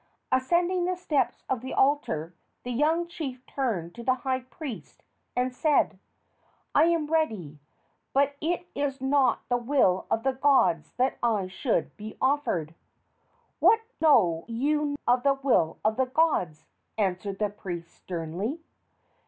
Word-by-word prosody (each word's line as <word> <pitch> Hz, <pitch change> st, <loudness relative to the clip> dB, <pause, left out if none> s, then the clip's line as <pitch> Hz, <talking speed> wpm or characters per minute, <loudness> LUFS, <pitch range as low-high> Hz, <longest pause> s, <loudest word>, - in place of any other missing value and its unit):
Ascending 345 Hz, +7 st, +2 dB
the 365 Hz, 0 st, 0 dB
steps 295 Hz, -9 st, -1 dB
of 255 Hz, -3 st, -1 dB
the 260 Hz, -, -5 dB
altar, 225 Hz, -, +1 dB, 0.3 s
the 250 Hz, -, -4 dB
young 315 Hz, +7 st, +1 dB
chief 265 Hz, -7 st, -6 dB
turned 205 Hz, -11 st, -2 dB
to 235 Hz, -, -9 dB
the 255 Hz, +2 st, +2 dB
high 260 Hz, -1 st, +1 dB
priest 260 Hz, 0 st, -9 dB, 0.3 s
and 250 Hz, +1 st, 0 dB
said: 300 Hz, +3 st, +2 dB, 0.7 s
"I -, -, +6 dB
am 335 Hz, -2 st, +2 dB
ready, 220 Hz, -, -1 dB, 0.5 s
but 280 Hz, +1 st, +2 dB
it 350 Hz, +3 st, -1 dB
is 280 Hz, -1 st, -2 dB
not 265 Hz, -2 st, +2 dB
the 245 Hz, -, +2 dB
will 240 Hz, -7 st, +2 dB
of 225 Hz, -, 0 dB
the 270 Hz, 0 st, +1 dB
gods 260 Hz, -, +2 dB
that 255 Hz, +2 st, 0 dB
I 220 Hz, -5 st, +1 dB
should 190 Hz, +6 st, -1 dB
be 215 Hz, +1 st, -8 dB
offered." 260 Hz, -, 0 dB, 0.9 s
"What 450 Hz, 0 st, +5 dB, 0.2 s
know 185 Hz, -, +4 dB
you 290 Hz, +5 st, 0 dB
of 245 Hz, +1 st, +4 dB
the 275 Hz, +1 st, +3 dB
will 250 Hz, -12 st, +1 dB
of 220 Hz, 0 st, +2 dB
the 260 Hz, -1 st, +2 dB
gods?" 255 Hz, -, +1 dB, 0.3 s
answered 195 Hz, -1 st, -1 dB
the 210 Hz, -1 st, -1 dB
priest, 175 Hz, -4 st, -7 dB
sternly. 180 Hz, -, -4 dB
255 Hz, 145 wpm, -27 LUFS, 200-290 Hz, 0.9 s, I